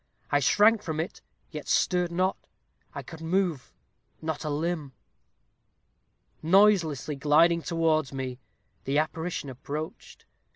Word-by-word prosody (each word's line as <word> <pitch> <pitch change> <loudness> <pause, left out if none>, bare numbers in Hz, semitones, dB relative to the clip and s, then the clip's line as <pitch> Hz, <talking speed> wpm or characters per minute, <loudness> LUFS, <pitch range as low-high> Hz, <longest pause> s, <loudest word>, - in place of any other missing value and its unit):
I - - +4
shrank 215 +1 +4
from 160 -5 -4
it, 165 - -4 0.3
yet - - -7
stirred 180 -2 +1
not 185 +2 +1 0.6
I - - -5
could 160 -1 -11
not 165 - -6
move 180 -7 0 0.5
a 160 -1 -3
limb. 150 -2 -2 1.5
Noiselessly 165 -6 +3
gliding 165 +4 +4
towards 160 -4 +1
me, 130 -2 -5 0.5
the 140 +2 0
apparition 160 0 -2
approached. 145 +4 -7
160 Hz, 115 wpm, -27 LUFS, 150-175 Hz, 1.5 s, I